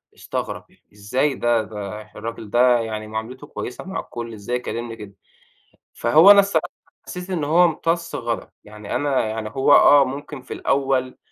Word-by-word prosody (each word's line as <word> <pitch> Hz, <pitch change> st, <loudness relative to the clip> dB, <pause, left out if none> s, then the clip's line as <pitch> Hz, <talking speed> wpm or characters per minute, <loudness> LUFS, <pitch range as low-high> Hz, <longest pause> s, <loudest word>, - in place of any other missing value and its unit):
استغرب -, -, -5 dB, 0.3 s
"إزاي 125 Hz, +8 st, -1 dB
ده، 120 Hz, -1 st, +1 dB
ده 105 Hz, 0 st, -7 dB
الراجل 115 Hz, -2 st, -7 dB
ده 120 Hz, +1 st, +4 dB
يعني 110 Hz, -1 st, -4 dB
معاملته 115 Hz, +6 st, -6 dB
كويسة 125 Hz, -, -7 dB
مع 190 Hz, +1 st, -4 dB
الكل، 115 Hz, -1 st, -7 dB
إزاي 110 Hz, +3 st, -4 dB
يكلمني 120 Hz, -1 st, -4 dB
كده؟" 105 Hz, -3 st, -11 dB, 0.8 s
فهو 155 Hz, -, +6 dB
أنا 200 Hz, -, +9 dB
الصراحة 195 Hz, -6 st, 0 dB, 0.4 s
حسيت 180 Hz, +1 st, -7 dB
إن 165 Hz, -5 st, -1 dB
هو 165 Hz, +5 st, +4 dB
امتص 170 Hz, 0 st, -1 dB
غضبي. 120 Hz, -1 st, -4 dB
يعني 105 Hz, -1 st, -8 dB
أنا 135 Hz, -2 st, 0 dB
يعني 110 Hz, 0 st, -4 dB
هو 135 Hz, +5 st, +2 dB
آه، 145 Hz, -1 st, +7 dB
ممكن 140 Hz, +1 st, -7 dB
في 130 Hz, -, -8 dB
الأول 135 Hz, -2 st, 0 dB
125 Hz, 160 wpm, -22 LUFS, 110-145 Hz, 0.8 s, أنا